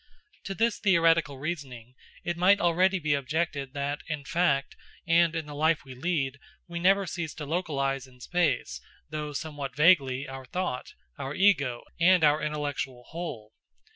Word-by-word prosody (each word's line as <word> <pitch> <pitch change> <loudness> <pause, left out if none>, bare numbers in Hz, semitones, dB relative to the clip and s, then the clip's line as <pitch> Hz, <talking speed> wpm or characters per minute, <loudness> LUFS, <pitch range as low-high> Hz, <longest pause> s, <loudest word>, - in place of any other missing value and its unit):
To 195 - -4
this 230 +2 +1
theoretical 165 -6 +3
reasoning 135 -6 -6 0.3
it 175 - -2
might 185 +4 +5
already 180 +3 +3
be 155 -4 0
objected 140 -1 -2
that, 140 +1 -2
in 155 -3 -4
fact, 145 -6 +1 0.3
and 165 0 +4
in 160 -2 -2
the 150 - -9
life 155 +1 +1
we 130 - -9
lead, 140 -1 -1 0.3
we 170 0 -5
never 195 +3 +4
cease 170 -4 -4
to 150 - -6
localise 140 -5 -1
in 125 -1 -20
space, 170 0 0 0.3
though 150 -1 -4
somewhat 145 -2 -5
vaguely, 145 -4 +4
our 135 0 -8
thought, 180 -4 -4 0.2
our 135 +2 -4
Ego, 140 -12 +3 0.2
and 180 0 +5
our 150 0 +4
intellectual 145 -4 -3
whole. 125 -11 -6
150 Hz, 155 wpm, -28 LUFS, 135-170 Hz, 0.3 s, might